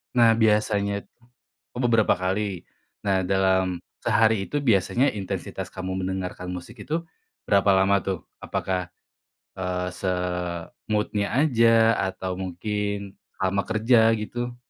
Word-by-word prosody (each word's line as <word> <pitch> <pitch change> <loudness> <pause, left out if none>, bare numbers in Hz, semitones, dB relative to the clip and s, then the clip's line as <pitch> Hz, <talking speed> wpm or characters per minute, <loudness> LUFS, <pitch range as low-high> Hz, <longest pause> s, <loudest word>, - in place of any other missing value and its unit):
Nah 115 -2 +6
biasanyat 105 -2 +2 0.7
oh 125 - -2
beberapa 115 -3 +4
kali? 95 +1 -2 0.4
Nah 95 -2 +2
dalam 95 -2 +1 0.2
sehari 110 -3 +2
itu 145 -1 -2
biasanya 120 +4 +3
intensitas 95 -2 -5
kamu 95 0 -5
mendengarkan 90 -1 -4
musik 90 -1 -9
itu 165 +2 -2 0.4
berapa 100 0 +3
lama 95 +1 +4
tuh? 95 -4 -2 0.2
Apakah, 90 -1 -2 0.7
eee, 90 -1 -2
se-mood-nya 90 +3 -2
aja 115 -5 +4
atau 95 -1 -3
mungkin 100 +2 -3 0.2
selama 95 +1 0
kerja 110 +1 +4
gitu? 120 +3 -4
100 Hz, 110 wpm, -25 LUFS, 95-110 Hz, 0.7 s, Nah